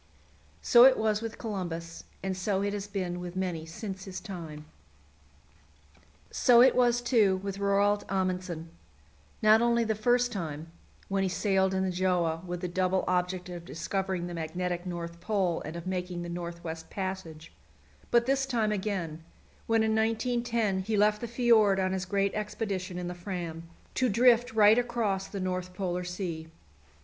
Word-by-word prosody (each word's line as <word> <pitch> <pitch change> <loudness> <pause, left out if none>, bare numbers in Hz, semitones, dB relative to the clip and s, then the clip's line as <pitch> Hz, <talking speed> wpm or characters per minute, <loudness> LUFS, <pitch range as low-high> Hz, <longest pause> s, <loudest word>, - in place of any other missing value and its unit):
So 240 0 +7
it 265 -1 +6
was 215 -1 +1
with 225 -1 -5
Columbus, 170 -6 -5 0.2
and 190 -1 -1
so 190 +1 -1
it 200 0 -1
has 205 -1 -4
been 185 -3 -3
with 180 0 -7
many 175 -4 -3
since 190 +3 -6
his 190 -1 -6
time. 160 -6 -8 1.7
So 245 -3 +5
it 260 - +5
was, 245 -1 +3
too, 220 -6 +4
with 200 0 -4
Roald 200 +1 +2
Amundsen 185 -3 -2 0.7
not 215 +1 +6
only 235 0 +3
the 220 -1 0
first 245 +3 +2
time, 165 -5 -5 0.4
when 195 0 0
he 190 - +1
sailed 190 0 +1
in 190 - +1
the 190 - 0
Gjöa 175 -2 0
with 175 -1 -5
the 180 - -2
double 185 +1 0
object 180 0 0
of 175 -1 -7
discovering 185 +2 -3
the 175 - -6
Magnetic 175 +2 -3
North 170 -1 -5
Pole 185 -2 0
and 155 +2 -7
of 170 - -7
making 180 -1 -3
the 175 - -6
North 170 0 -6
West 160 -1 -6
Passage, 185 -5 -6 0.6
but 235 0 +4
this 270 +1 +1
time 225 -5 +1
again, 190 -6 -3 0.4
when 225 -1 +3
in 220 - +1
1910 225 -2 0
he 210 +3 -1
left 210 +1 +3
the 235 - -3
fjord 225 -4 +4
on 185 0 +1
his 190 -1 -2
great 200 +1 0
expedition 200 -3 -3
in 180 -1 -4
the 180 - -4
Fram, 175 -3 -6 0.2
to 255 -1 +1
drift 240 +2 +4
right 215 +1 +6
across 225 -6 -1
the 200 - -6
North 185 -1 -3
Polar 180 -2 -2
Sea. 175 -3 -5
190 Hz, 170 wpm, -29 LUFS, 175-215 Hz, 1.7 s, So